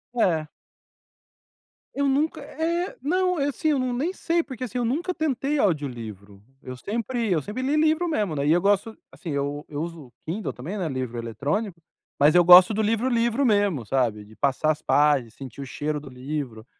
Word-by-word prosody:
É. 165 -9 +1 1.5
Eu 280 0 +1
nunca 300 +3 0
É, 335 +5 -2
não. 365 +4 +1
Assim, 285 +2 0
eu 285 -3 +2
não 255 -1 -1
nem 295 +9 -1
sei, 340 -2 0
porque, 255 -2 -7
assim, 250 0 -4
eu 240 - 0
nunca 335 +10 -1
tentei 290 -2 -1
audiolivro. 115 - -3 0.2
Eu 130 0 -8
sempre 230 - -3
eu 160 -4 +2
sempre 210 - -5
li 280 +3 0
livro 315 +3 +2
mesmo, 210 - -1
né? 140 0 -1
E - - +4
eu 175 +1 +4
gosto 205 +3 +1
assim, 170 - -9
eu 145 +1 -2
eu 145 0 -4
uso 165 -7 -7
Kindle 190 +6 -3
também, 165 +12 -6
né, 180 -4 -2
livro 130 -3 -4
eletrônico. 145 - -3 0.4
Mas 150 +2 +5
eu 175 - +7
gosto 180 +4 +9
do 220 - 0
livro, 225 +4 +1
livro 235 +3 +1
mesmo, 205 - +2
sabe? 115 -4 0
De 110 +1 -17
passar 140 +2 +1
as 150 - -4
páginas, 145 -6 +2
sentir 135 0 -9
o - - -5
cheiro 150 +3 -3
do 140 -2 -11
livro. 125 -3 -5
185 Hz, 190 wpm, -25 LUFS, -, 1.5 s, gosto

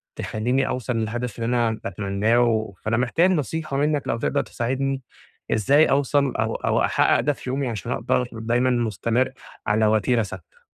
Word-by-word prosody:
تخلّيني 125 +5 -1
أوصل 125 -1 -2
للهدف 115 +1 -3
اللي 115 - -2
أنا 115 -2 +1
باتمناه 100 +4 +1
و 110 -3 +1
فأنا 110 +2 0
محتاج 130 +9 +2
نصيحة 155 -3 -2
منّك 145 -1 0
لو - - 0
تقدر - - 0
تساعدني، 135 +3 -2 0.5
إزاي 140 +9 +4
أوصل 140 0 +2
أو 110 0 -1
أو - - +1
أحقق - - +3
ده 145 - +1
في 130 - -8
يومي 135 0 -1
عشان 110 -4 -5
أقدر 125 - 0
دايمًا 120 +3 0
مستمر 120 +1 0 0.4
على 110 +1 +3
وتيرة 110 +2 +2
ثابتة؟ 95 -4 -10
120 Hz, 160 wpm, -23 LUFS, 110-135 Hz, 0.5 s, إزاي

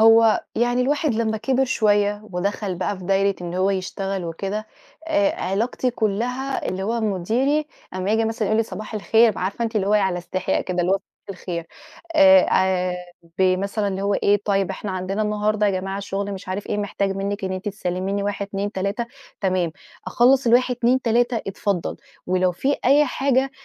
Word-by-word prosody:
هو 225 0 +6
يعني 245 +2 +2
الواحد 290 0 +1
لما 220 -1 0
كِبر 260 +4 +1
شوية، 205 -3 +2
ودخل 195 +1 -2
بقى 185 +2 -2
في 185 - -10
دايرة 195 +1 +2
إن 175 0 -5
هو 190 +2 +2
يشتغل 195 0 -3
وكده، 195 +6 -4 0.4
آآ 305 0 +2
علاقتي 230 +6 0
كلها 245 +5 -2
اللي 185 +1 -3
هو 230 +4 -1
مديري 230 - 0 0.3
أمّا 185 +2 -2
ييجي 225 +1 +2
مثلًا 220 -2 -1
يقول 215 - +2
لي - - +4
صباح 215 0 -7
الخير، 220 +2 +3
عارفة 195 +5 -2
أنتِ، 225 -1 -2
اللي 195 -2 +1
هو 205 - +1
على 190 -4 +2
استحياء 185 +1 -1
كده، 180 -1 -2
اللي 175 +2 +1
هو - - +4
صباح 195 - -15 0.2
الخير 175 -3 -5 0.5
إيه، - - +4 0.3
آآ 185 -1 +2
آآ - - -4 0.4
بمثلًا، 195 +3 +1
اللي 195 0 -3
هو 200 0 +1
إيه، 205 0 +2
طيب 195 -2 +1
إحنا 195 +1 -5
عندنا 190 +3 -2
النهاردة 210 0 +1
يا - - +3
جماعة 195 +1 -4
شغل 200 0 -3
مش 190 -1 -8
عارف 195 +2 -3
إيه، - - -2
محتاج 200 -1 -1
منِك 200 +1 -3
إن 190 - -2
أنتِ 185 +2 -3
تسلميني 195 0 -2
1 200 0 -2
2 200 +1 -3
3، 200 +5 -2 0.3
تمام، 185 -4 0 0.3
أخلّص 255 +1 +4
ال1 250 +2 +4
2 250 +2 +2
3، 240 +1 +2
اتفضل، 195 -2 -2 0.3
ولو 185 0 +2
فيه 275 +10 0
أي 285 +4 +6
حاجة، 270 0 +1
205 Hz, 185 wpm, -22 LUFS, 190-230 Hz, 0.5 s, هو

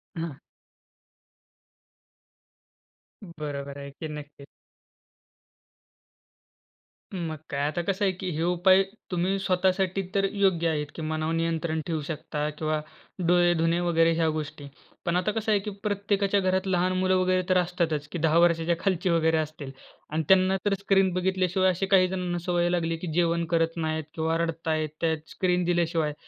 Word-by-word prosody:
हां. 165 -4 -4 2.9
बरोबर 145 -5 -6
आहे 140 0 -7
की. 155 +3 -7
नक्कीच. 150 -2 -9 2.7
मग 165 -4 -3
काय. 140 -1 -2
आता 175 +3 -2
कसं 195 +3 -1
आहे 190 - +3
की 185 0 -5
हे 165 - 0
उपाय 180 +2 +4 0.3
तुम्ही 180 +2 0
स्वतःसाठी 190 0 +1
तर 195 0 +3
योग्य 185 -4 +2
आहेत, 150 -2 -1
की - - -6
मनावर 155 +1 -2
नियंत्रण 165 -1 -1
ठेवू 160 -2 -1
शकता 150 -1 -3
किंवा 155 0 -2 0.5
डोळे 175 0 +4
धुणे 165 +1 +2
वगैरे 165 -1 +3
ह्या 165 0 +1
गोष्टी. 155 -2 -5 0.4
पण 170 - 0
आता 180 +4 +1
कसं 220 0 -1
आहे 205 - +4
की 210 +2 -5
प्रत्येकाच्या 200 -1 +1
घरात 190 0 0
लहान 185 0 +1
मुलं 185 0 +2
वगैरे 185 0 +2
तर 185 - +4
असतातच 170 -4 0
की - - -3
10 160 +1 +3
वर्षाच्या 170 0 +3
खालची 185 -2 0
वगैरे 160 -1 +3
असतील. 155 -3 -4 0.4
आणि 155 +1 -1
त्यांना 190 0 +5
तर 205 - +2
स्क्रीन 195 -1 +3
बघितल्याशिवाय 185 0 +1
अशी 185 +2 0
काही 185 -1 +6
जणांना 180 -1 -2
सवय 175 -1 +1
लागली 165 -2 0
की 175 - -6
जेवण 170 0 +1
करत 165 0 +1
नाहीत 160 -1 -1
किंवा 160 0 0
रडत 165 -1 -3
आहेत 155 -1 0
त्यात, 160 -1 +1
स्क्रीन 180 -1 0
दिल्याशिवाय. 165 -3 +1
170 Hz, 155 wpm, -26 LUFS, 160-185 Hz, 2.9 s, काही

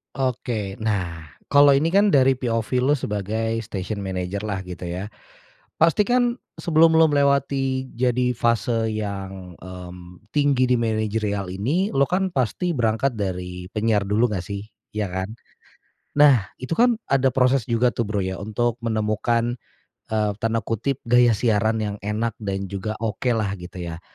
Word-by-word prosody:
Oke. 115 -6 -2
Nah 90 -7 -2 0.2
kalau 145 0 +7
ini 145 +4 +2
kan 200 +3 +4
dari 135 -2 +5
POV 115 -3 -1 0.2
lo 145 - +4
sebagai 110 -1 -2
station 100 +2 -4
manager 95 +1 -3
lah 100 -3 -2
gitu 90 -1 -8
ya, 90 +4 -4 0.7
pastikan, 240 +9 +3 0.2
sebelum 165 0 +4
lo 160 - +7
melewati 140 -2 +1
jadi 125 0 +1
fase 115 0 +1
yang, 95 -4 -5
mmm, 90 -1 -10 0.2
tinggi 140 -3 +3
di 125 - +3
manajerial 110 -3 -1
ini, 135 - -1
lo 135 - +5
kan 190 +2 +1
pasti 170 +3 -1
berangkat 120 +2 +1
dari 90 -1 -4
penyiar 110 -1 +1
dulu 105 +5 +2
nggak 90 -3 -2
sih, 100 +2 -5 0.3
ya 105 -1 -2
kan? 95 +3 -3 0.9
Nah 135 -9 +6 0.2
itu 130 +6 -3
kan 240 -1 +4
ada 135 -1 +3
proses 130 -2 +3
juga 120 +1 +2
tuh 115 0 -2
Bro 105 -1 -1
ya 95 -1 -3
untuk 110 +3 -1
menemukan, 115 +2 0 0.5
eee, 105 -1 0
tanda 115 -1 0
kutip, 115 +6 -1
"gaya 120 -1 +4
siaran 110 -1 +2
yang 105 -1 -2
enak 110 +2 -1
dan 100 -2 -3
juga 110 +3 -3
oke 115 +3 0
lah," 105 -3 -1
gitu 90 0 -7
ya? 85 -1 -6
110 Hz, 150 wpm, -23 LUFS, 100-130 Hz, 0.9 s, kalau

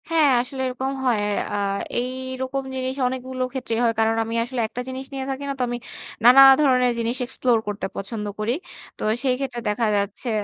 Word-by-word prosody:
হ্যাঁ, 320 -3 +4
আসলে 265 +1 -6
এরকম 260 +1 -3
হয়। 235 -5 +2 0.3
আ - - 0 0.4
এই 250 +1 -2 0.3
রকম 270 +1 -2
জিনিস 260 0 -2
অনেকগুলো 255 0 -3
ক্ষেত্রেই 240 -4 -2
হয়। 230 -1 +3
কারণ 225 0 +3
আমি 225 +1 -4
আসলে 245 0 -3
একটা 245 - -6
জিনিস 260 +1 -6
নিয়ে 265 -1 -3
থাকি 270 +1 -5
না। - - -1
তো - - +1
আমি 240 - -2 0.5
নানা 250 +3 +9 0.2
ধরনের 250 -3 +4
জিনিস 230 +2 -1
এক্সপ্লোর 245 -1 +2
করতে 205 -2 -3
পছন্দ 210 +2 -5
করি। 215 +3 0 0.4
তো - - -6 0.2
সেই 255 -2 +2
ক্ষেত্রে 260 -3 -3
দেখা 220 +2 +1
যাচ্ছে 200 +5 -2
250 Hz, 190 wpm, -23 LUFS, 230-260 Hz, 0.5 s, নানা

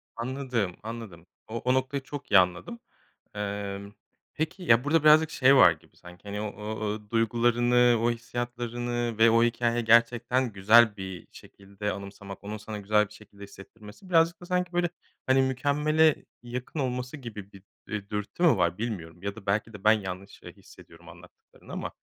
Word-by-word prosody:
Anladım, 120 -6 -3
anladım. 110 -7 -8 0.2
O 110 - -8
o 125 +2 +1
noktayı 130 +1 -1
çok 145 -3 -9
iyi 105 - +8
anladım. 90 +5 -1 0.6
Emm, 100 -1 -5 0.4
peki, 160 +4 -4
ya, 115 -6 +4
burada 150 +2 +2
birazcık 155 +1 +6
şey 135 +1 +5
var - - +8
gibi - - -12
sanki, 90 +2 -15
hani, 105 0 -5
o 105 -1 -4
o 105 -1 -4
duygularını, 120 +1 +3
o 120 - +2
hissiyatlarını 120 0 -4
ve 115 +1 +6
o 115 0 +4
hikâyeyi 120 0 0
gerçekten 120 +1 +3
güzel 105 +2 +5
bir 95 -2 -7
şekilde 100 +1 -7
anımsamak, 100 +1 -9
onun 105 +1 -5
sana 105 0 -7
güzel 105 +1 +2
bir 105 - -17
şekilde 100 -1 -15
hissettirmesi 105 - -14
birazcık 165 0 +3
da 175 - -10
sanki 180 -1 -1
böyle, 175 0 +1 0.4
hani, 130 0 +4
mükemmele 145 +4 +2 0.2
yakın 125 +5 -6
olması 125 +1 -3
gibi 105 -6 -9
bir, 95 -1 -15 0.2
eee, 100 -1 -5
dürtü 105 - -4
mü 160 - +5
var 85 -1 +1
bilmiyorum 95 -6 -6
ya 100 0 -4
da 110 -3 -12
belki 110 +3 -1
de 100 - -11
ben 110 - +6
yanlış, 95 +1 -8
eee, - - -10
hissediyorum - - -16
anlattıklarını - - -17
ama. - - -5
115 Hz, 170 wpm, -27 LUFS, 100-125 Hz, 0.6 s, iyi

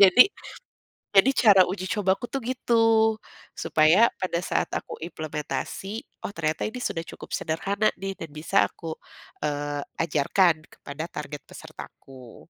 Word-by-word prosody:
jadi 195 +5 +9 0.9
jadi 200 +7 +7
cara 200 -5 +7
uji 185 0 -4
cobaku 200 +1 0
tuh 275 - -1
gitu, 245 0 -1 0.8
supaya 160 +9 +4
pada 180 -2 -1
saat - - 0
aku - - -5
implementasi 160 +6 -5 0.2
oh - - -6
ternyata 155 -1 -1
ini 250 +3 -7
sudah 165 - -2
cukup - - -11
sederhana 200 +7 0
nih 195 0 -3
dan 165 - -7
bisa 155 +6 -4
aku, 165 -2 -7 0.5
eee, 145 -1 -2 0.2
ajarkan 160 +3 +3 0.2
kepada 140 +2 -7
target 150 -1 -7
pesertaku. 130 -3 -12
170 Hz, 130 wpm, -26 LUFS, 155-200 Hz, 0.9 s, jadi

